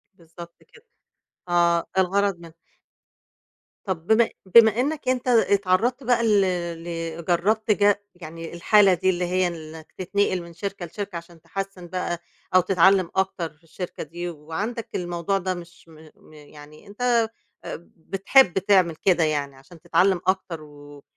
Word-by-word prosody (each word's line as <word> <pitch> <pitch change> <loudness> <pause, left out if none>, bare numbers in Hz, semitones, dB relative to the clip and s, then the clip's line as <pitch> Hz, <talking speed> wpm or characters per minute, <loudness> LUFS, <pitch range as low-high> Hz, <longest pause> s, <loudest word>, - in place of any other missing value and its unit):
بالضبط 170 0 -13 0.2
كده، 470 +1 -19 0.6
آه، 170 -1 +3
الغرض 195 0 +1
منّه. 170 -1 -13 1.3
طَب 175 -3 -4
بم 225 +1 +4 0.3
بما 220 0 +7
إنَّك 275 -1 -1
أنت 255 0 -1
اتعرضت 225 +2 +2
بقى 240 -1 +2
ل 210 -2 +4 0.8
ل 170 - -9
جرّبت 215 +6 +1
ج 205 -1 +4 0.2
يعني 165 -1 -9
الحالة 195 +2 +5
دي 185 +2 +1
اللي 180 -1 0
هي 180 +1 +1
إنَّك 160 -2 -9
تتنقل 185 0 0
من 170 0 -12
شركة 195 +1 -5
لشركة 200 +2 -7
علشان 170 -1 -9
تحسّن 190 +1 -6
بقى 175 -1 -3 0.4
أو 185 - +7
تتعلم 185 0 +3
أكتر 190 -3 -1
في 150 - -34
الشركة 170 +2 -7
دي، 175 +1 -6
وعندَك 170 +9 -5
الموضوع 175 +2 -1
ده 185 0 -2
مش 175 -1 -12
م 155 -1 -16
م - - -21
يعني 150 +2 -15
أنت، 205 +4 -12 0.6
آآ، 170 - -8
بتحب 195 +6 +3
تعمل 185 -4 +3
كده 175 0 +2
يعني 145 -3 -1
علشان 135 +5 -17
تتعلم 175 +2 +2
أكتر، 185 -4 -1
و 145 -1 -14
180 Hz, 145 wpm, -24 LUFS, 165-200 Hz, 1.3 s, بما